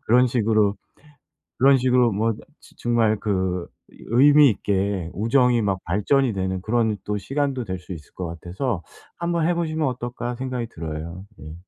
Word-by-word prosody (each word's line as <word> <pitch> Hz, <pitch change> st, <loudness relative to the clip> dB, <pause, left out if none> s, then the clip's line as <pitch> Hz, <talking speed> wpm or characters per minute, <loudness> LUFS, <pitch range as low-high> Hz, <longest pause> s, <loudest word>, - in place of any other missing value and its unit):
그런 125 Hz, +3 st, +5 dB
식으로 110 Hz, -4 st, +2 dB, 0.8 s
그런 135 Hz, +1 st, +6 dB
식으로 125 Hz, -2 st, +3 dB
뭐 110 Hz, +3 st, +1 dB, 0.3 s
즈 -, -, -20 dB
정말 115 Hz, -3 st, +1 dB
그 95 Hz, -4 st, -1 dB, 0.4 s
의미 145 Hz, +4 st, +6 dB
있게 95 Hz, -4 st, -1 dB
우정이 120 Hz, +3 st, +3 dB
막 95 Hz, -2 st, 0 dB
발전이 110 Hz, -, +1 dB
되는 95 Hz, -1 st, -2 dB
그런 110 Hz, -1 st, +1 dB
또 105 Hz, 0 st, -2 dB
시간도 135 Hz, +1 st, -2 dB
될 95 Hz, -3 st, -4 dB
수 90 Hz, +1 st, -9 dB
있을 80 Hz, -4 st, -11 dB
것 90 Hz, -, -5 dB
같아서 90 Hz, -, -4 dB, 0.3 s
'한번 170 Hz, -1 st, 0 dB
해 -, -, +3 dB
보시면 160 Hz, -3 st, -1 dB
어떨까?' 120 Hz, -1 st, -4 dB
생각이 125 Hz, -3 st, -4 dB
들어요. 85 Hz, +2 st, -7 dB
예. 75 Hz, +1 st, -9 dB
115 Hz, 300 characters per minute, -23 LUFS, 95-125 Hz, 0.8 s, 그런